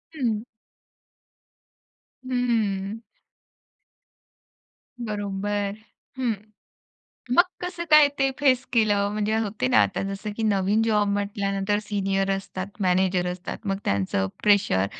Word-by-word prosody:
हं. 230 -7 -1 1.8
हम्म. 225 -5 0 2.1
बरोबर. 205 -1 -2 0.4
हं. 250 -3 +1 1.0
मग 350 - +7 0.2
कसं 355 -1 -4
काय 305 -1 +8
ते 270 -1 +3
फेस 260 -3 +3
केलं? 205 -4 +3
म्हणजे 215 +1 0
होते 205 - -1
ना 110 -4 +5
आता 100 - -1
जसं 205 +2 -5
की 225 - -3
नवीन 205 0 +2
जॉब 210 -2 +2
म्हटल्यानंतर 200 0 -1
सीनियर 195 -2 -1
असतात, 190 -1 -6 0.2
मॅनेजर 185 0 +2
असतात. 180 +1 -7
मग 195 -1 -1
त्यांचं 95 -1 0 0.2
प्रेशर 200 - +3
205 Hz, 105 wpm, -25 LUFS, 195-225 Hz, 2.1 s, काय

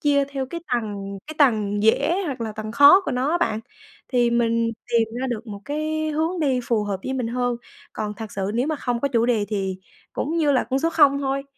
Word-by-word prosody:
chia 285 -1 +3
theo 275 -1 -4
cái 340 +4 -6
tầng 200 -4 -4
cái 310 - -7
tầng 210 -7 +2
dễ 335 - +3
hoặc 270 -5 -4
là 225 -2 -3
tầng 215 +1 -6
khó 285 +9 +8
của - - -2
nó 255 +4 0
á 345 - +1
bạn, 220 -10 0 0.5
thì 240 -2 +2
mình 230 -1 +1 0.2
tìm 225 -1 +3
ra 265 - -1
được 230 0 -4
một 200 -2 -7
cái 310 +1 -2
hướng 320 +4 -1
đi 265 -5 +1
phù 220 -3 0
hợp 195 -2 -3
với 265 - -2
mình 255 -3 -2
hơn. 245 0 -1 0.4
Còn 210 -1 -4
thật 220 -1 -8
sự 195 0 -2
nếu 245 +3 +1
mà 310 0 -1
không 245 -4 -2
có 280 - +1
chủ 235 -3 +2
đề 225 -4 +2
thì 195 -3 -2 0.3
cũng 320 +4 -2
như 300 -3 +3
là 260 - +2
con 265 - +2
số 330 - +1
không 285 -4 +5
thôi, 275 0 -1
245 Hz, 240 wpm, -23 LUFS, 220-285 Hz, 0.5 s, khó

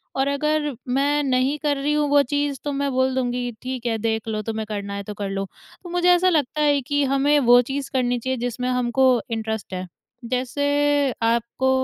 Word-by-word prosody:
और 270 0 +1
अगर 300 +1 0 0.2
मैं 280 +3 +1
नहीं 260 +1 +1
कर 290 -1 0
रही 285 +2 0
हूँ 300 0 +1
वो 285 0 +5
चीज़ 285 0 -1
तो 290 - -2
मैं 280 0 -1
बोल 260 0 +1
दूँगी 245 -1 -1
ठीक 255 -1 -5
है 230 -2 0
देख 220 0 -2
लो 215 -1 -2
तुम्हें 220 0 -4
करना 200 -1 -4
है 200 0 -4
तो 210 - -7
कर 205 -1 -4
लो। 195 0 -2 0.5
मुझे 355 0 +2
ऐसा 360 +1 +5
लगता 305 -3 0
है 290 -1 +3
कि 285 +2 0
हमें 275 +2 +3
वो 245 -2 +6
चीज़ 270 +2 -4
करनी 245 -2 +1
चाहिए 260 +2 -2
जिसमें 245 +1 -2
हमको 250 +1 +2 0.2
इंटरेस्ट 220 -3 -3
है। 185 0 -4 0.4
जैसे 255 +4 -1 0.6
आपको 235 +3 +1
260 Hz, 200 wpm, -23 LUFS, 235-285 Hz, 0.6 s, वो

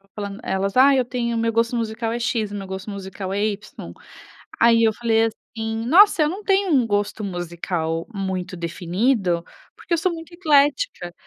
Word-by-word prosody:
falando 200 -1 -6
elas: 195 +1 -2
"Ah, 275 +2 +7
eu 255 -2 +2
tenho 235 -1 -2
o - - 0
meu 230 0 +1
gosto 230 +2 +1
musical 225 0 -2
é 235 - -2
X, 225 -3 -1
o - - -5
meu 195 -1 -6
gosto 190 +2 -6
musical 195 -1 -6
é 205 +1 0
Y". 205 - -6 0.7
Aí 230 0 +5
eu 220 -1 +3
falei 225 0 +2
assim: 225 0 -5
"Nossa, 350 - +6
eu 300 - +1
não 385 +6 -6
tenho 390 -1 +2
um 260 -5 +4
gosto 205 +1 -1
musical 170 -3 -3
muito 190 -2 -4
definido, 175 +2 0 0.3
porque - - -5
eu - - +3
sou 360 +3 0
muito 330 +1 -10
eclética. 295 - +1
220 Hz, 185 wpm, -22 LUFS, 190-250 Hz, 0.7 s, Ah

